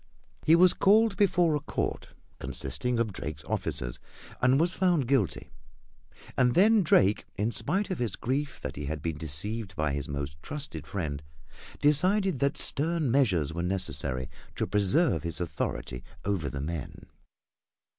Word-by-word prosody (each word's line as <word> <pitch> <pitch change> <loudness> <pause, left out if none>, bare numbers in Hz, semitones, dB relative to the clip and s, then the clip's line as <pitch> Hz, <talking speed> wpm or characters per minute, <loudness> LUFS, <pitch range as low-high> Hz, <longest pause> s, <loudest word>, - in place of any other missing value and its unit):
He 160 - +7
was 180 +1 +6
called 215 +1 +4
before 180 -5 +3
a - - 0
court 145 - -3 0.3
consisting 115 - -3
of 115 -3 0
Drake's 75 -2 -5
officers - - -2 0.4
and 130 +3 +4
was 170 +2 +3
found 175 -9 +2
guilty. 125 -9 0 0.8
And 125 -1 +3
then 215 +3 +5
Drake, 105 - +3
in 105 +4 0
spite 185 - -1
of 185 - -3
his 120 -5 -1
grief 140 +4 -2
that - - -6
he 75 - -4
had 75 +1 -4
been 80 -2 -3
deceived 100 +8 -1
by 75 -2 0
his 70 0 -4
most 70 +1 -5
trusted 85 - -6
friend, 75 -5 -4 0.6
decided 185 +3 +3
that 140 0 +1
stern 155 -2 +1
measures 95 - +2
were 85 - -3
necessary 70 -8 0 0.3
to - - -1
preserve 105 - +2
his 85 -1 -2
authority 60 -7 -4 0.2
over 95 -8 -1
the 70 - -5
men. 80 0 -6
105 Hz, 150 wpm, -28 LUFS, -, 0.8 s, He